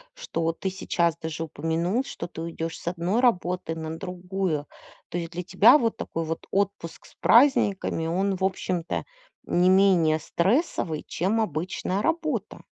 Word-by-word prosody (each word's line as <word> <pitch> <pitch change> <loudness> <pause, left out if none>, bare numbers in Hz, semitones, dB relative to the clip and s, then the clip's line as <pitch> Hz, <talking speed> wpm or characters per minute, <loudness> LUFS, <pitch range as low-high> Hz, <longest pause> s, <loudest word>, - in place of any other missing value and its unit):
что 165 - -2
ты 190 - -3
сейчас 170 -3 0
даже 160 0 -4
упомянул, 165 - -1
что - - -6
ты 165 - -8
уйдешь 165 0 -5
с - - -14
одной 180 +5 0
работы 180 -8 +1
на 160 0 -5
другую. 180 -3 -3 0.4
То - - -3
есть 170 -1 -4
для 175 +1 -4
тебя 205 - +6
вот 230 -5 -1
такой 165 - -4
вот 165 +1 -5
отпуск 195 -4 -2
с - - -18
праздниками, 205 - +3
он 190 +4 0
в 190 - -5
общем-то 185 -2 -1 0.4
не 180 +1 +3
менее 185 -5 +4
стрессовый, 175 - 0
чем 195 +6 0
обычная 185 +1 -2
работа. 310 - -2
180 Hz, 150 wpm, -26 LUFS, 165-200 Hz, 0.4 s, тебя